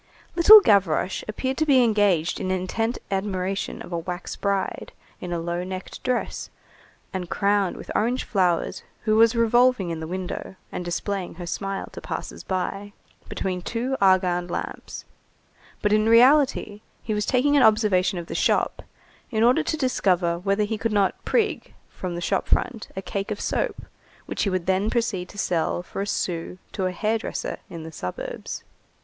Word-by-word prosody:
Little 410 +5 +10
Gavroche 195 - +2
appeared 260 +5 -2
to 315 - +2
be 265 -3 +6
engaged 205 -7 +2
in 185 - -3
intent 185 +6 -1
admiration 195 -1 -2
of - - -11
a 170 - -1
wax 175 +2 -5
bride, 200 -1 -2 0.3
in 180 - -6
a 175 - 0
low 170 +1 -2
necked 185 0 -7
dress, 250 -1 -2 0.6
and 180 -2 -4
crowned 200 -2 +1
with - - -8
orange 240 +4 +1
flowers, 180 -5 0 0.2
who 215 -1 +1
was 225 +1 +5
revolving 230 -4 +3
in 165 - -4
the 160 - -5
window, 185 +1 -5 0.2
and - - -4
displaying 180 +2 -3
her 175 0 -7
smile 195 +3 -3
to - - -9
passers - - -6
by, 195 +2 -3 0.4
between 185 -1 -3
two 240 +7 -2
argand 185 -2 +3
lamps; - - -5 0.8
but 210 0 +3
in 215 +1 +3
reality, 245 -3 +4 0.2
he 220 - -2
was 210 0 0
taking 280 +3 +3
an 285 - +5
observation 210 -5 +3
of 170 - -5
the - - -7
shop, - - +1 0.5
in 220 -2 +1
order 245 +2 +5
to 315 - -2
discover 180 - +1
whether 200 +3 +1
he 215 +1 -2
could 225 0 -1
not 200 -2 +1
"prig" 460 -3 0 0.2
from 180 -2 -5
the 175 - -4
shop 190 +2 0
front 235 -4 0
a 190 - -4
cake 200 +1 -3
of 210 - -3
soap, - - -2 0.4
which - - -4
he - - +1
would 185 -2 -1
then 190 +3 +1
proceed 225 -7 -1
to 205 - -13
sell 175 -3 0
for 195 - -5
a 200 - -3
sou 175 -3 -2
to 190 -3 -1
a - - -2
"hair 220 +4 0
dresser" - - -4
in 165 -2 -7
the 160 - -8
suburbs. 90 - -6
195 Hz, 175 wpm, -24 LUFS, 180-225 Hz, 0.8 s, Little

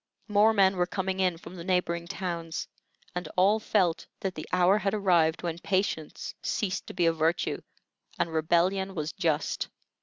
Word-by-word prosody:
More 210 +1 +5
men 195 -3 +4
were 180 0 +2
coming 190 0 -2
in 180 -3 +2
from 175 - -11
the 170 - -7
neighboring 170 -2 0
towns, 170 -3 -4 0.5
and 175 -2 -4
all 200 +4 +5
felt 185 -6 +1
that 190 -1 -2
the 155 - -8
hour 180 +3 +4
had 200 0 0
arrived 175 -6 +3
when 170 -1 -3
patience 185 -5 -2
ceased 190 -3 -2
to - - -7
be 175 - +2
a 165 - +4
virtue 165 +2 0 0.6
and 165 - -1
rebellion 180 +5 +1
was 155 -1 -2
just. 155 -2 0
180 Hz, 170 wpm, -28 LUFS, 165-190 Hz, 0.6 s, More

